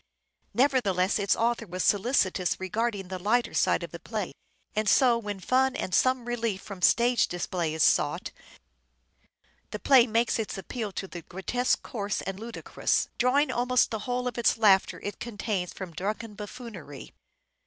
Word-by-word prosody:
' - - -55
Nevertheless 220 -8 +2
its 200 -1 +2
author 230 -1 0
was 185 +1 -3
solicitous 195 -4 +1
regarding 200 0 -2
the 185 -1 -5
lighter 230 +6 +1
side - - +2
of - - -7
the - - -8
play; - - -4 0.4
and 215 -1 +1
so 245 +2 +5
when 205 -4 -4
fun 260 +6 +2
and 185 - -4
some 255 +4 +2
relief 230 -5 -2
from 195 -2 -9
stage 240 +4 +4
display 175 -2 -2
is 160 - +2
sought, - - +2 1.4
the - - -4
play 255 +2 +5
makes 230 +1 +1
its 215 - -3
appeal 210 +3 -5
to 195 - -4
the 175 -2 -8
grotesque 215 +9 -1
coarse 205 -3 -3
and 195 +1 -5
ludicrous, 230 +1 -1
drawing 265 +5 +3
almost 250 +1 +2
the 220 - -2
whole 250 0 -1
of 245 - -2
the 235 0 +2
laughter 200 -4 +4
it 205 -1 -6
contains 205 -5 -3
from 185 -3 -8
drunken 210 +5 -4
buffoonery. 205 - -9
215 Hz, 165 wpm, -27 LUFS, 190-240 Hz, 1.4 s, so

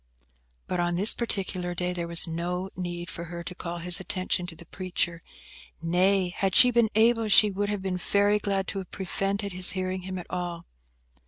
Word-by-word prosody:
But 180 - -3
on 175 0 0
this 200 +5 +3
particular 185 -6 -2
day 180 +1 -2
there 170 -1 -4
was 170 0 +4
no 180 +3 -3
need 175 -1 -5
for 170 -1 -6
her 170 0 -7
to 180 - -6
call 175 -1 -6
his 175 +1 +1
attention 185 -1 -2
to 170 - -9
the 170 - -13
preacher; 175 -2 -3 0.6
nay, 180 +3 +2
had 190 +1 -1
she 250 - +8
been 235 -2 +3
able, 225 0 +3
she 210 0 +7
would 205 +1 -2
have 205 -2 -3
been 185 -1 -2
very 205 +3 +2
glad 195 -2 -1
to 195 - -3
have 190 - -8
prevented 195 +1 -3
his 185 +1 +5
hearing 185 0 -3
him 185 0 -6
at 180 - -7
all. 175 -1 -4
185 Hz, 195 wpm, -27 LUFS, 175-195 Hz, 0.6 s, she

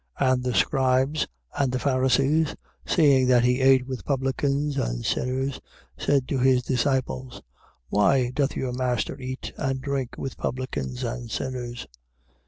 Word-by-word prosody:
2:16. 130 -1 +4
And 125 -1 -1
the 125 -1 -1
scribes 135 +2 +2 0.3
and 135 -3 +2
the 130 - 0
Pharisees, 135 +4 +2 0.3
seeing 140 -6 +4
that 125 -2 +5
he 125 +1 +2
ate 130 -1 +5
with 130 -1 -5
publicans 140 +1 0
and - - -2
sinners, 130 +2 -1 0.3
said 140 -3 +1
to 135 - 0
his 130 -1 +3
disciples: 125 - -1 0.5
Why 120 +5 +3
doth 140 +1 0
your 130 -2 -2
master 125 -1 -1
eat 130 0 -6
and 135 -2 -1
drink 135 -2 -3
with 135 - -5
publicans 125 - -3
and 120 0 -4
sinners? 125 0 -4
130 Hz, 145 wpm, -25 LUFS, 125-135 Hz, 0.5 s, that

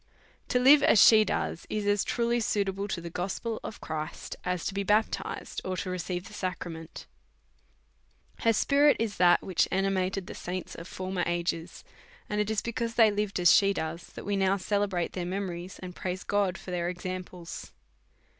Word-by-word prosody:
To 250 - +1
live 275 +4 +7
as 230 - +5
she 215 +1 +8
does, 170 - -2
is 210 -1 -2
as 205 0 +2
truly 235 0 0
suitable 200 -2 -1
to 190 - -3
the 170 0 -7
gospel 195 +6 -3
of 220 - -7
Christ, 155 0 -5
as 180 -2 -2
to - - -2
be 200 - -1
baptized 210 +3 -1
or 185 0 -2
receive 180 0 -3
the 210 - -12
sacrament. 175 -4 -5 1.3
Her 230 - +3
spirit 285 +6 +4
is 220 -3 -2
that 175 -1 +5
which 185 - +1
animated 190 0 0
the - - -8
saints 180 0 -5
of 165 - -9
for 185 0 -5
mer 185 -2 -1
ages; 170 -1 -2 0.4
and 210 0 0
it 210 - -1
is 220 -2 0
because 235 0 -3
they 225 -3 +6
lived 205 -2 -1
as 175 0 +6
she 200 0 +5
does 165 0 -4
that - - -8
we 205 - 0
now 195 0 +2
celebrate 195 -2 -1
their 180 - -3
memories, 180 -1 -4
and 180 -1 -7
praise 185 0 -4
God 200 -2 0
for 185 - -9
their 175 -1 -1
examples. 180 -1 -6
190 Hz, 180 wpm, -29 LUFS, 180-210 Hz, 1.3 s, she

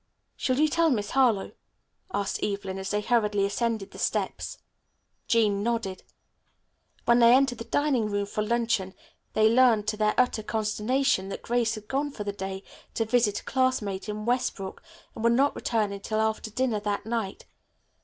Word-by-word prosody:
"Shall 255 -1 0
you 310 - +5
tell 330 +2 +2
Miss 210 -7 -1
Harlowe?" 240 -7 +2 0.6
asked 200 - -2
Evelyn 195 -2 -3
as 190 0 -4
they 210 0 0
hurriedly 210 -3 +2
ascended 215 0 -2
the - - -11
steps. - - -2 0.7
Jean 210 -4 +2
nodded. 225 -4 -2 1.0
When 235 0 +5
they 235 +1 +7
entered 265 -3 +2
the 230 - -6
dining 265 -5 +1
room, 205 -1 -1
for 210 +1 -3
luncheon 225 -4 0 0.4
they 215 0 +4
learned 230 -3 +4
to 215 - -2
their 215 0 +2
utter 250 -3 +2
consternation 215 0 0
that - - -6
Grace 235 -1 +1
had 215 -1 -10
gone 280 +2 -1
for 235 -7 -6
the 205 -1 -3
day 190 0 -5 0.3
to 225 - +1
visit 220 -2 +2
a - - -24
classmate 240 -7 -1
in 210 0 -4
Westbrook 240 -5 -2 0.3
and 220 - -7
would 235 0 +4
not 275 +4 +3
return 220 -4 0
until 200 +2 -3
after 220 0 -1
dinner 235 -1 0
that 205 0 -2
night. 225 -4 -3
220 Hz, 170 wpm, -27 LUFS, 205-245 Hz, 1.0 s, they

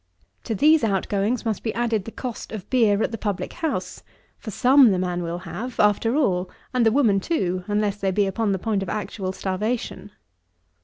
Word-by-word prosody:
To 225 - -2
these 310 +7 +4
outgoings 205 +3 0
must 220 -3 -1
be 220 - -3
added 230 -4 0
the 225 - -7
cost 245 -1 -6
of 215 -4 -7
beer 220 -5 +3
at - - -1
the 225 - -5
public 205 -3 -3
house; 325 -3 -3 0.4
for - - -7
some 255 +4 +5
the 190 - +1
man 180 -1 -1
will 170 0 -3
have, 190 +8 -7
after 210 +4 +3
all, 185 -11 +1 0.2
and 250 -1 +2
the 225 - +4
woman 225 -6 +3
too, 185 - -1
unless 205 -1 0
they 195 -1 -1
be 200 +2 +2
upon 205 +2 -1
the 195 - +1
point 205 +1 -1
of 195 - -4
actual 200 -2 -3
starvation. 205 +2 -3
210 Hz, 195 wpm, -23 LUFS, 190-235 Hz, 0.4 s, some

